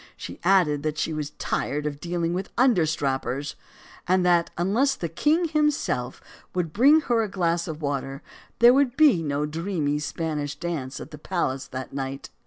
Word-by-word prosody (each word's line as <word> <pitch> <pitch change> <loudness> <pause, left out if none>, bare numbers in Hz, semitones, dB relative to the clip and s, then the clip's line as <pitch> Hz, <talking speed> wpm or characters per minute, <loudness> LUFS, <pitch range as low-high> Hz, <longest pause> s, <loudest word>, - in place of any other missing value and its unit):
She - - -8
added 175 -6 +3
that 155 0 -2
she 160 - -1
was 150 -1 -3
tired 150 +1 -2
of 145 -1 -3
dealing 170 +1 -2
with 185 +2 -3
understrappers, 150 - +1 0.5
and 185 0 +3
that, 175 -1 +3
unless 230 +11 +2
the 175 - -3
king 305 - +1
himself 300 - 0 0.3
would 170 -4 -1
bring 285 +8 +6
her 240 -5 +1
a 215 - -2
glass 170 -3 0
of 160 -2 -5
\vater, 140 -1 -3 0.4
there 240 +1 +7
would 270 -2 +2
be 290 - +5
no 145 -1 -1
dreamy 155 -2 -2
Spanish 150 -1 -3
dance 150 -7 -4
at - - -9
the 150 - -10
palace 150 -6 -2
that 130 0 -7
night. 135 0 -5
165 Hz, 170 wpm, -25 LUFS, 145-195 Hz, 0.5 s, there